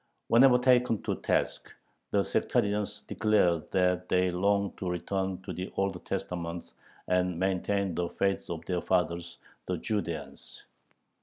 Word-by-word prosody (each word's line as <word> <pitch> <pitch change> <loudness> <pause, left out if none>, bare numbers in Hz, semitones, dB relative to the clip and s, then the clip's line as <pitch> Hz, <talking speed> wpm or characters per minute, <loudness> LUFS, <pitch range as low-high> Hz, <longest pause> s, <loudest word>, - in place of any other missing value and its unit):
Whenever 125 +2 +7
taken 125 -3 +3
to - - -1
task, - - -1 0.4
the - - +2
sectarians 105 0 0
declared 95 -7 +1
that 90 -1 +1
they 90 0 +3
longed 100 +2 +1
to 90 - -2
return 95 +2 -2
to - - -5
the 90 +1 -5
Old 95 0 -1
Testament 85 -1 -4 0.4
and 90 -1 +1
"maintain 95 +1 0
the 85 +1 -1
faith 100 +2 -1
of 80 -2 -5
their 90 -2 -1
fathers, 85 -2 -1 0.3
the 90 - -1
Judeans." 90 -3 -4
95 Hz, 135 wpm, -29 LUFS, 90-100 Hz, 0.4 s, Whenever